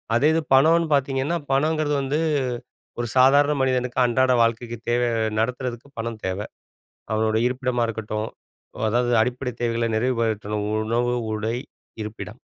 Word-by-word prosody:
அதே 140 Hz, +5 st, +4 dB
இது 165 Hz, -, +2 dB
பணம்னு 165 Hz, +5 st, +5 dB
பார்த்தீங்கன்னா, 135 Hz, +3 st, +1 dB, 0.2 s
பணங்கறது 150 Hz, +1 st, +1 dB
வந்து 140 Hz, +3 st, -1 dB, 0.8 s
ஒரு 120 Hz, -, -1 dB
சாதாரண 140 Hz, +3 st, +5 dB
மனிதனுக்கு 125 Hz, -1 st, 0 dB
அன்றாட 130 Hz, +2 st, +2 dB
வாழ்க்கைக்கு 115 Hz, +1 st, -1 dB
தேவை 120 Hz, 0 st, +2 dB, 0.3 s
நடத்துறதுக்கு 125 Hz, +2 st, -3 dB
பணம் 115 Hz, -1 st, -4 dB
தேவ. 95 Hz, 0 st, -1 dB, 0.7 s
அவனோட 110 Hz, 0 st, +1 dB
இருப்பிடமா 125 Hz, -1 st, -1 dB
இருக்கட்டும், 110 Hz, -1 st, -3 dB, 0.6 s
அதாவது 120 Hz, +2 st, +1 dB
அடிப்படை 125 Hz, +1 st, -2 dB
தேவைகள 115 Hz, -1 st, 0 dB
நிறைவுபடுத்தணும் 110 Hz, -3 st, -1 dB, 0.2 s
உணவு, 120 Hz, +2 st, 0 dB, 0.2 s
உடை, 110 Hz, +2 st, -2 dB, 0.5 s
இருப்பிடம், 105 Hz, 0 st, -8 dB
120 Hz, 120 wpm, -23 LUFS, 115-135 Hz, 0.8 s, பணம்னு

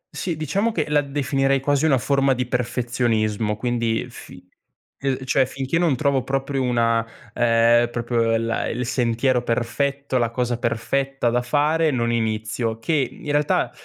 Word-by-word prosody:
Sì, 170 Hz, -4 st, -3 dB
diciamo 195 Hz, +9 st, 0 dB
che 160 Hz, -7 st, -2 dB
la 150 Hz, -, +4 dB
definirei 135 Hz, -1 st, 0 dB
quasi 145 Hz, +2 st, +1 dB
una 135 Hz, -4 st, +4 dB
forma 135 Hz, +1 st, +2 dB
di 125 Hz, 0 st, -1 dB
perfezionismo, 120 Hz, -3 st, -1 dB
quindi 115 Hz, -1 st, -1 dB
fi 90 Hz, -6 st, -13 dB, 0.5 s
uhm, 135 Hz, -1 st, -1 dB
cioè 130 Hz, 0 st, +2 dB
finché 135 Hz, +4 st, -2 dB
non 165 Hz, -6 st, +2 dB
trovo 140 Hz, -1 st, +1 dB
proprio 135 Hz, +1 st, -2 dB
una 115 Hz, -2 st, +1 dB, 0.3 s
ehm, 120 Hz, 0 st, +3 dB
proprio 115 Hz, -1 st, 0 dB
la 115 Hz, 0 st, -1 dB
il 125 Hz, +1 st, -3 dB
sentiero 125 Hz, +1 st, +1 dB
perfetto, 130 Hz, +3 st, -1 dB
la 120 Hz, -1 st, +1 dB
cosa 120 Hz, 0 st, -2 dB
perfetta 125 Hz, +2 st, -1 dB
da 125 Hz, 0 st, +1 dB
fare, 150 Hz, +5 st, +2 dB
non 120 Hz, -4 st, 0 dB
inizio, 110 Hz, 0 st, -1 dB
che 115 Hz, +8 st, -2 dB, 0.2 s
in 150 Hz, -1 st, -6 dB
realtà, 145 Hz, 0 st, +1 dB
125 Hz, 150 wpm, -22 LUFS, 115-140 Hz, 0.5 s, la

